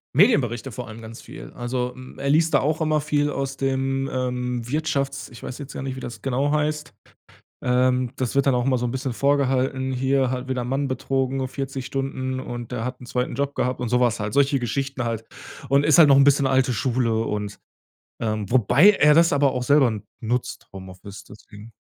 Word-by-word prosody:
Medienberichte, 135 - +3
vor 125 +1 -7
allem 110 +1 -10
ganz 115 +1 -10
viel. - - -11
Also, 125 0 -2
hm, 130 0 -12
er 140 - -2
liest 160 +3 +3
da - - +4
auch 155 +3 0
immer 155 -1 +1
viel 145 0 0
aus 135 -1 -3
dem, 135 0 -1
ähm, 125 -1 -2
Wirtschafts 140 -1 -2
ich 120 - -13
weiß 125 - -6
jetzt 145 -1 -9
gar - - -5
nicht, 135 -1 -4
wie - - -5
das 120 - -8
genau 135 +2 0
heißt 150 -3 -1 0.7
ähm, 125 0 +2
das 130 0 -2
wird 140 - +3
dann 135 -2 +3
auch 125 0 0
immer 130 -1 +2
so 125 - -2
'n 120 - -2
bisschen 130 0 -3
vorgehalten, 130 -1 +1
hier 130 0 +1
halt 130 0 -4
wieder 130 -2 -1
'n - - -6
Mann 135 +2 -1
betrogen, 130 0 -1
40 135 0 -5
Stunden 130 -1 -3
und 120 -1 -7
der 120 -2 -3
hat 125 +1 -5
'n 125 - -11
2. 125 +1 -2
Job 140 +1 -2
gehabt 125 0 -1
und 125 - -2
so 125 +2 +1
was 120 -2 +2
halt 105 0 -3
solche 140 0 +3
Geschichten 130 +2 -3
halt. 115 -1 -3 0.5
Und 140 +2 +3
ist 155 - +5
halt 160 -4 +8
noch 135 - +7
'n 140 - +6
bisschen 140 -1 +4
alte 130 -1 +2
Schule 120 0 0
und, 105 -2 -4 0.6
ähm 110 -3 -2
wobei 130 - +5
er 150 -7 +4
das 165 -1 +5
aber 140 -1 +3
auch 125 -1 -3
selber 130 -5 +3 0.2
nutzt 120 +2 -3
Homeoffice 95 +1 -11
deswegen. 105 +1 -14
130 Hz, 210 wpm, -23 LUFS, 125-140 Hz, 0.7 s, halt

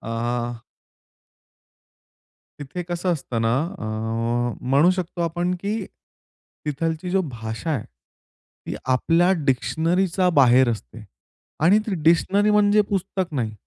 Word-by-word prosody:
अ. 120 +1 -3 2.0
तिथे 145 +5 -5
कसं 175 +1 -1
असतं 125 -7 -3
ना, 115 +1 +2 0.2
अ, - - -6 0.9
म्हणू 145 +7 +5
शकतो 175 -1 -4
आपण 175 +2 -1
की 200 +3 -2 0.9
तिथली 160 +4 -2
जी 195 - +2
भाषा 110 +6 -5
आहे 140 -8 -1 0.8
ती - - -4 0.2
आपल्या 170 +7 +3 0.2
डिक्शनरीच्या 170 +7 +1
बाहेर 130 -1 +6
असते. 115 0 -7 0.6
आणि 195 +6 +6
ती 210 - -1
डिक्शनरी 190 +6 +3
म्हणजे 210 0 +4
पुस्तक 190 -2 -2
नाही. 115 -5 -1
165 Hz, 110 wpm, -23 LUFS, 125-180 Hz, 2.0 s, बाहेर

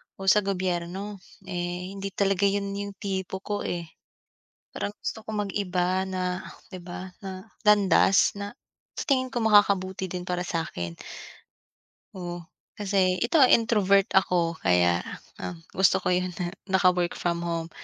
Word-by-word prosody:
o 195 0 +3
sa 210 - +5
gobyerno. 190 +1 -3 0.2
Eh 180 0 -4
hindi 195 0 -5
talaga 195 0 +2
yun 200 0 -1
yung 200 0 -4
tipo 190 -1 -4
ko 205 -1 -2
eh. 175 -1 -2 0.9
Parang 205 - -3
gusto 220 - -5
ko - - -5
mag-iba 190 -2 0
na, 185 -1 -2 0.3
'di 185 - -7
ba, 180 +1 -7
na 190 -2 -7 0.2
landas 200 -1 +5
na 205 +2 -5 0.4
sa - - -3
tingin 260 -2 +2
ko 250 -2 -3
makakabuti 195 -3 +3
din 180 0 -5
para 180 0 -2
sa'kin. 160 - -3 1.2
Oh, 175 -2 -6 0.3
kasi, 190 -3 +2
ito, 235 - +2
ah, 255 - +7
introvert 200 -4 +4
ako, 175 -3 +2
kaya, 90 -1 +3 0.4
um, 175 - -5 0.2
gusto 190 -1 +4
ko - - +1
yung 185 0 0 0.4
naka-work 180 -2 +3
from 170 -1 -1
home 170 -1 -3
190 Hz, 140 wpm, -26 LUFS, 180-200 Hz, 1.2 s, ah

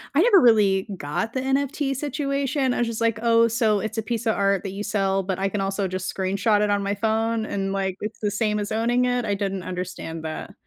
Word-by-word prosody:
I 315 - +5
never 410 -3 +6
really 210 -5 +4
got 175 +10 -3
the 260 - -1
NFT 275 +1 0
situation. 275 -1 -1
I - - -2
was 240 - +1
just 230 -1 -4
like, 230 -1 +1
"Oh, 230 0 +4
so 225 -2 +2
it's 220 +1 -3
a - - 0
piece 230 +1 -3
of 220 - +2
art 195 -1 +1
that 195 - -4
you 200 +1 -6
sell, 195 -2 0
but 190 0 -3
I 195 - 0
can 200 0 -2
also 195 0 -1
just 185 0 -3
screenshot 200 +3 +1
it 210 -1 +2
on 200 0 +1
my 200 +1 -1
phone 220 +1 0
and 195 -2 -2
like, 190 -1 -2
it's 210 +1 -5
the 210 -1 -1
same 210 0 0
as 205 +1 -4
owning 240 +3 +1
it." 245 -1 0
I 205 - 0
didn't 195 -1 -2
understand 180 -3 -5
that. 155 0 -6
210 Hz, 240 wpm, -24 LUFS, 195-235 Hz, -, never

